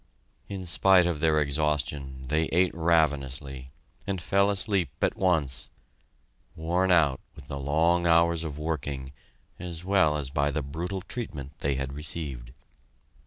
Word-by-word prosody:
In 95 -2 -5
spite 90 +1 +5
of 85 -4 -1
their 80 -1 +3
exhaustion, 70 -2 -1
they 80 +3 +1
ate 90 +3 +2
ravenously, 70 -5 0 0.4
and 95 -2 -1
fell 100 +3 +2
asleep 100 - +2
at - - +1
once, 75 -9 0 0.9
worn 85 +4 0
out 75 -7 +4 0.2
with - - -13
the 70 - -4
long 85 +5 +2
hours 85 0 +4
of 75 -3 -5
working 70 -4 -4 0.5
as 85 -1 -7
well 95 -6 +3
as 70 -3 -3
by 70 +1 +1
the 75 0 -2
brutal 85 +7 -4
treatment 80 - -6
they 70 -1 0
had 65 0 -3
received. 70 -5 -5
80 Hz, 140 wpm, -27 LUFS, 70-85 Hz, 0.9 s, spite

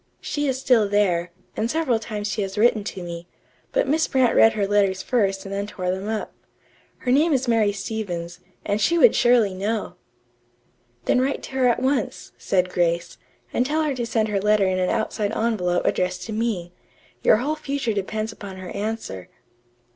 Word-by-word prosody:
She 290 -1 -2
is 260 -1 -1
still 235 -6 +3
there, 180 -4 +1 0.2
and 225 - -1
several 290 -7 +1
times 210 -2 -4
she 205 - -2
has 195 +1 -4
written 220 -1 +3
to 190 -3 -5
me, 170 0 -7 0.4
but - - +1
Miss 315 +2 +2
Brant 260 -3 +3
read 225 - +6
her 205 -2 0
letters 195 -2 +1
first 195 -6 0
and 195 - -6
then 200 +1 -2
tore 185 -3 -3
them 190 +2 -4
up. 220 -1 -3 0.7
Her 250 - 0
name 305 +5 +4
is 260 -1 0
Mary 225 -3 +3
Stevens, 195 -4 -5 0.3
and 205 +1 0
she 340 +11 +3
would 470 +7 +7
surely 240 -5 +4
know!" 210 +4 -3 1.1
"Then 250 - +3
write 270 +2 -1
to - - -8
her 260 -1 +2
at 240 - +2
once," 265 -4 -1
said 185 -1 0
Grace, 170 -1 0 0.3
"and 245 - +2
tell 305 +4 0
her 300 -2 0
to 240 -3 -3
send 220 -2 0
her 200 -2 0
letter 210 -1 +3
in 185 0 +1
an 180 - +1
outside 220 -2 -1
envelope 195 -6 0
addressed 180 0 0
to 220 - -6
me. 210 -6 -2 0.5
Your 215 - +5
whole 285 +7 -1
future 280 -6 -2
depends 215 +2 -3
upon 200 -3 -9
her 185 -1 -8
answer." 205 - -4
215 Hz, 190 wpm, -23 LUFS, 190-245 Hz, 1.1 s, would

